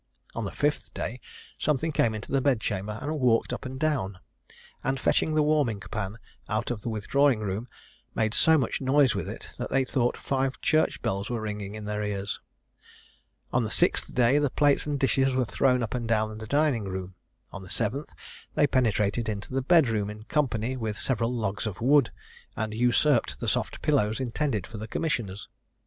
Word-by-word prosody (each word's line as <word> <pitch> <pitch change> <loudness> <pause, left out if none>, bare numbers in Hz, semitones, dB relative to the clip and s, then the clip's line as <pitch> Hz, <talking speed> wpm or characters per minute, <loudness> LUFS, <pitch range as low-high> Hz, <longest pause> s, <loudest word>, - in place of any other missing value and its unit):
On - - -3
the - - -4
fifth - - -1
day, - - -4 0.4
something 155 +2 +1
came 115 -6 +2
into 110 - -7
the 135 - +2
bedchamber 105 -6 0
and 150 +1 -2
walked 120 -3 +2
up - - -5
and 130 +1 -7
down, 135 -12 0 0.7
and 135 +1 0
fetching 155 +3 +2
the 155 - +4
warming 145 -8 +2
pan 100 +1 -5 0.3
out 110 +3 -1
of 115 -3 -4
the 120 - -3
withdrawing 120 +4 +2
room, 105 +3 -3 0.5
made 110 -1 +1
so 160 +6 +5
much 130 -2 -1
noise 135 -1 +4
with - - -3
it - - -8
that - - -3
they 135 - +2
thought 125 -2 0
five 135 0 -1
church 155 0 +1
bells 100 +1 -1
were 120 -2 -1
ringing 105 -1 -5
in 110 -1 -7
their 105 0 -2
ears. 100 -1 -3 1.1
On - - +3
the - - -2
sixth - - +1
day, 125 +3 +4
the 145 -1 +2
plates 145 +2 +2
and 145 -1 -1
dishes 135 0 +2
were 130 -1 +2
thrown 125 +1 +2
up 110 - -3
and 120 -2 -2
down 110 -1 +1
the 110 - -7
dining 140 -4 +2
room. 95 -1 -5 0.4
On 95 - -7
the 95 - -11
seventh, 120 - -1 0.4
they - - +5
penetrated 115 -4 +1
into 105 +4 -5
the 135 - +1
bed 160 +1 +5
room 105 -3 -1
in 105 +1 -8
company 125 -2 0
with 110 -4 -3
several 120 -2 +1
logs 110 -3 -2
of 100 - -5
wood, 135 +1 +4 0.4
and 110 0 -3
usurped 125 +6 +2
the - - -4
soft - - -1
pillows 110 -8 +2
intended 125 - -1
for 110 - -9
the 110 - -6
commissioners. 110 - -2
120 Hz, 190 wpm, -27 LUFS, 105-135 Hz, 1.1 s, so